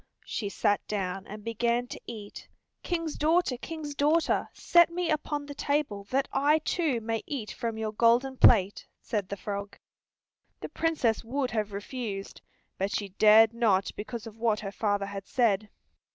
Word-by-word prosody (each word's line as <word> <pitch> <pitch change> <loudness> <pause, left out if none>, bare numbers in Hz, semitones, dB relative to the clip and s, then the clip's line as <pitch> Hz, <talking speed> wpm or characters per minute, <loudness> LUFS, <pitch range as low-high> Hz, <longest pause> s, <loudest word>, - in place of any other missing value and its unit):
She 205 -3 -3
sat 205 +1 +1
down 195 -2 -3
and 210 0 -9
began 235 +2 0
to - - -8
eat. 210 -3 -9 0.3
"King's 330 -3 -2
daughter, 320 -2 +2
King's 305 +3 -6
daughter, 300 +3 +2
set 345 -1 +4
me 340 -1 -2
upon 295 -1 -2
the 285 - -7
table 285 -9 -1
that 265 +6 0
I 290 +3 +4
too 310 -4 0
may 225 0 -2
eat 255 -8 -4
from 230 -3 -4
your 220 -1 -2
golden 240 +4 +3
plate," 200 -5 +5
said 205 -4 -3
the 200 - -4
frog. 200 +1 -5 0.8
The - - -5
Princess 305 -9 0
would 255 +2 -2
have 215 -2 -1
refused, 200 -1 -6 0.4
but 195 +1 0
she 200 -1 -3
dared 215 +3 +6
not 210 -5 +2
because 215 +1 -6
of 225 0 -11
what 220 -2 +1
her 195 -2 -5
father 205 -1 0
had 200 -1 -7
said. 215 -5 +1
230 Hz, 165 wpm, -28 LUFS, 205-285 Hz, 0.8 s, dared